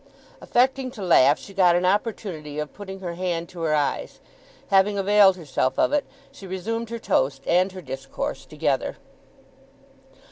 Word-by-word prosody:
Affecting 260 +1 +1
to 205 - -5
laugh, 150 -5 +5
she 200 - -12
got 180 -3 +4
an 175 +1 +1
opportunity 185 -7 -2
of 150 -1 -4
putting 195 -1 -9
her 175 -2 -4
hand 170 -1 -2
to 175 - -9
her 155 -2 +1
eyes. 145 -1 -2 0.5
Having 200 +1 +3
availed 195 -1 +5
herself 135 -5 -1
of - - +2
it, 295 - +2 0.3
she 195 - -12
resumed 225 +5 -4
her 235 - -4
toast 135 - 0
and 185 +2 +2
her 185 -1 -9
discourse 135 0 -5
together. - - -1
185 Hz, 155 wpm, -24 LUFS, 160-205 Hz, 0.5 s, laugh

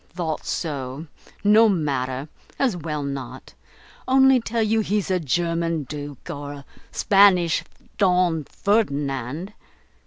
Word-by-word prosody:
"Thought 165 -4 -4
so. 140 -2 -4 0.4
No 215 +2 +6
matter, 140 -6 -1 0.3
as 255 -8 +1
well 150 -3 -4
not. 140 -1 -6 0.5
Only 265 0 +5
tell 230 0 -1
you 220 +1 +2
he's 210 -2 -1
a 185 - +2
German 165 +1 -1
Duke, 145 0 -8
or 145 0 -6
a 140 -1 -11 0.3
Spanish 195 -4 +4 0.4
Don 180 -5 +2
Ferdinand. 145 - -1
165 Hz, 115 wpm, -23 LUFS, 145-200 Hz, 0.5 s, No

